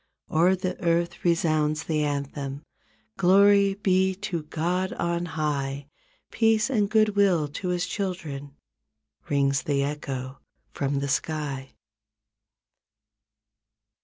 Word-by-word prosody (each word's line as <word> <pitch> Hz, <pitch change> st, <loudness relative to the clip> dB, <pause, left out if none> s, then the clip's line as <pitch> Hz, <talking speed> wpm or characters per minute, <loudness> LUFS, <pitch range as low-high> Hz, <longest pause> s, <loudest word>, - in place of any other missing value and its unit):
O'er 175 Hz, +4 st, +4 dB
the 185 Hz, 0 st, -4 dB
earth 170 Hz, 0 st, 0 dB
resounds 155 Hz, -2 st, +1 dB
the 155 Hz, -2 st, 0 dB
anthem 140 Hz, 0 st, -3 dB, 0.5 s
"Glory 200 Hz, +1 st, +5 dB
be 190 Hz, -1 st, +2 dB
to 195 Hz, -4 st, -4 dB
God 175 Hz, +5 st, -2 dB
on 170 Hz, 0 st, -1 dB
high. 140 Hz, -2 st, -2 dB, 0.5 s
Peace 225 Hz, +2 st, +2 dB
and 210 Hz, -5 st, +1 dB
good 215 Hz, 0 st, +4 dB
will 185 Hz, -7 st, +3 dB
to 165 Hz, +6 st, -5 dB
His 180 Hz, 0 st, 0 dB
children" 160 Hz, -8 st, -5 dB, 0.7 s
Rings 140 Hz, -1 st, +2 dB
the 140 Hz, -2 st, 0 dB
echo 135 Hz, -2 st, -4 dB, 0.3 s
from 140 Hz, 0 st, -1 dB
the 140 Hz, -, -2 dB
sky. 140 Hz, -2 st, -2 dB
165 Hz, 105 wpm, -26 LUFS, 145-190 Hz, 0.7 s, Glory